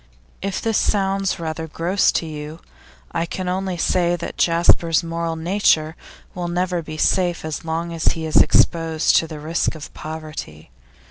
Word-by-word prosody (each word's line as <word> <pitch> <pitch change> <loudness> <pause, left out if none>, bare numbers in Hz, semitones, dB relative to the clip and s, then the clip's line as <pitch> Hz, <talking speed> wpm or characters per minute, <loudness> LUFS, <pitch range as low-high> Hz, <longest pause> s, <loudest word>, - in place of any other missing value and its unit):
If 195 0 -2
this 225 -2 +2
sounds 195 -2 0
rather 160 0 -4
gross 175 +5 +1
to - - 0
you, 155 0 -7 0.5
I 165 0 -1
can 185 +2 -4
only 185 0 -2
say 175 +1 +2
that 175 - -6
Jasper's 170 0 +3
moral 165 0 -2
nature 160 -2 +2 0.4
will 175 -1 -4
never 175 0 -1
be 155 -1 -8
safe 175 0 +1
as 155 -2 -4
long 165 +1 -3
as 165 - +1
he 160 -1 -5
is 155 - +1
exposed 165 -1 +4
to 165 - +1
the 155 -2 -8
risks 160 +2 -1
of 155 - -9
poverty. 155 - -8
165 Hz, 160 wpm, -21 LUFS, 160-180 Hz, 0.5 s, exposed